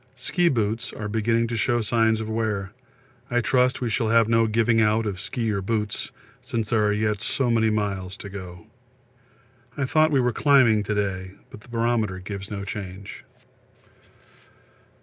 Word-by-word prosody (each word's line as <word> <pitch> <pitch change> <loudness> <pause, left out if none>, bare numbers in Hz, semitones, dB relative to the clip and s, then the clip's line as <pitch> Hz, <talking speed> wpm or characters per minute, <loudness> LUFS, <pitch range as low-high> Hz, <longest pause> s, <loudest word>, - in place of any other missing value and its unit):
Ski 170 +7 +1
boots 115 -1 -1
are 105 - -5
beginning 115 +2 +1
to 115 0 -3
show 120 +2 +1
signs 110 0 +2
of 110 - -4
wear; 110 -3 -2 0.6
I 120 -1 +2
trust 125 +2 +2
we 120 - -1
shall 115 +1 0
have 115 0 +4
no 115 0 +3
giving 115 +1 +2
out 110 +1 +2
of 100 -3 -3
ski 110 +3 -2
or 100 -2 -1
boots, 105 0 -2 0.3
since 115 -2 -3
there 110 -2 +3
are - - +2
yet 105 0 0
so 125 +1 0
many 110 -1 +3
miles 100 -3 -2
to 100 - -8
go. 90 -3 -9 1.1
I 140 - 0
thought 155 +4 +3
we 140 -3 +2
were 125 -1 +1
climbing 130 -7 +4
to 105 - -1
day, 95 -2 -2 0.2
but - - -11
the 120 - -18
barometer 115 -4 0
gives 100 +1 -7
no 100 -2 -5
change. 95 -1 -7
110 Hz, 170 wpm, -24 LUFS, 100-115 Hz, 1.1 s, have